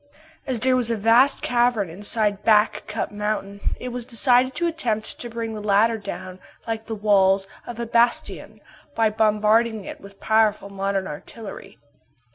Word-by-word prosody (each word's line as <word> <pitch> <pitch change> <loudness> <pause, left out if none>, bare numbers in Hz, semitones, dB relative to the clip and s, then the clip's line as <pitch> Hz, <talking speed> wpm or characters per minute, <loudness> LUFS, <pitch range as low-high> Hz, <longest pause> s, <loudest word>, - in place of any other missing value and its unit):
As 250 -4 -2
there 260 0 +3
was 245 -2 +1
a 230 - 0
vast 235 +6 +4
cavern 240 -4 +1
inside 205 +3 -1
Back 215 -1 +3
Cup 215 +1 -3
mountain, 205 -1 -3 0.2
it 250 - -5
was 245 0 -4
decided 250 +2 +2
to 345 - -1
attempt 245 -11 -2
to 240 - -6
bring 230 -1 -4
the 215 - -6
latter 215 +2 +2
down 185 -2 -7 0.3
like 225 -1 -4
the 225 - -4
walls 195 -2 +3 0.2
of 235 -1 -7
a 235 - -2
bastion, 235 +1 0 0.3
by 225 -1 +2
bombarding 215 0 +2
it - - -9
with 200 0 -14
powerful 215 -2 +1
modern 195 0 -2
artillery. 200 +7 -9
220 Hz, 160 wpm, -23 LUFS, 205-235 Hz, 0.3 s, vast